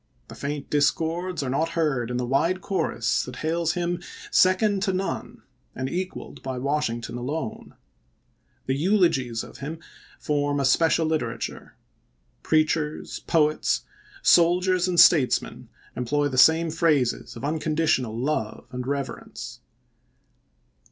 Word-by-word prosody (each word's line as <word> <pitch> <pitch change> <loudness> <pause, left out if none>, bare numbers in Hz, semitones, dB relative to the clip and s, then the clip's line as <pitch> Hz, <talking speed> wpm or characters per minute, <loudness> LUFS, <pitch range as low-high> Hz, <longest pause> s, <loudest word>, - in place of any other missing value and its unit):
The - - -9
faint 145 0 -5
discords 160 +3 0
are 130 - -3
not 160 +5 0
heard 135 -8 0
in 125 - -2
the 125 - -1
wide 165 +9 +1
chorus 120 - 0
that 125 - -8
hails 165 0 0
him 175 0 -2 0.3
second 195 +2 +3
to 190 -1 0
none 190 +1 -4 0.3
and 130 +1 -3
equaled 185 +6 -5
by 130 -1 -4
Washington 120 -4 -2
alone. 135 -1 -5 0.9
The 130 - 0
eulogies 145 - +1
of - - -12
him 150 +4 -5 0.4
form 145 -1 0
a 140 - +1
special 165 +4 +3
literature. 155 -8 -3 0.7
Preachers, 155 -1 0
poets, 155 -2 +2 0.4
soldiers, 180 +1 +4
and 175 -2 +1
statesmen 140 -7 +4 0.3
employ 145 +4 0
the 130 - -4
same 160 +3 +5
phrases 155 -7 +1
of - - -6
unconditional 150 -6 0
love 125 -4 -2
and 125 0 -5
reverence. 140 -1 -5
150 Hz, 125 wpm, -25 LUFS, 130-170 Hz, 0.9 s, same